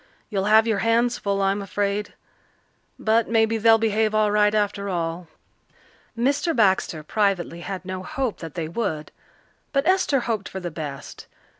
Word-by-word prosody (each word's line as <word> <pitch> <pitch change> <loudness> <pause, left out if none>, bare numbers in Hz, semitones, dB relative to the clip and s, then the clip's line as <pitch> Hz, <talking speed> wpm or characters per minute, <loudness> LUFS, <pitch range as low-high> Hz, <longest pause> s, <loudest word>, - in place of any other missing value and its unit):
You'll 195 -2 0
have 220 +1 +5
your 220 -3 0
hands 235 +1 +2
full, 200 -1 -1
I'm 195 +1 +1
afraid. 200 +1 -2 0.8
But 220 +1 +1
maybe 225 0 +2
they'll 225 +1 +6
behave 220 -1 +1
all 215 -1 +3
right 210 0 +3
after 205 -1 -1
all." 170 -1 -3 0.9
Mr. 285 +7 +1
Baxter 190 -7 +2
privately 190 -2 0
had 190 0 -6
no 185 0 -5
hope 260 - -3
that 165 -1 -8
they 165 -3 -3
would, 160 -5 -3 0.6
but 275 +1 +1
Esther 360 -7 +2
hoped 220 -4 -3
for 190 - -6
the 175 -2 -5
best. 145 -3 -7
205 Hz, 155 wpm, -23 LUFS, 185-225 Hz, 0.9 s, they'll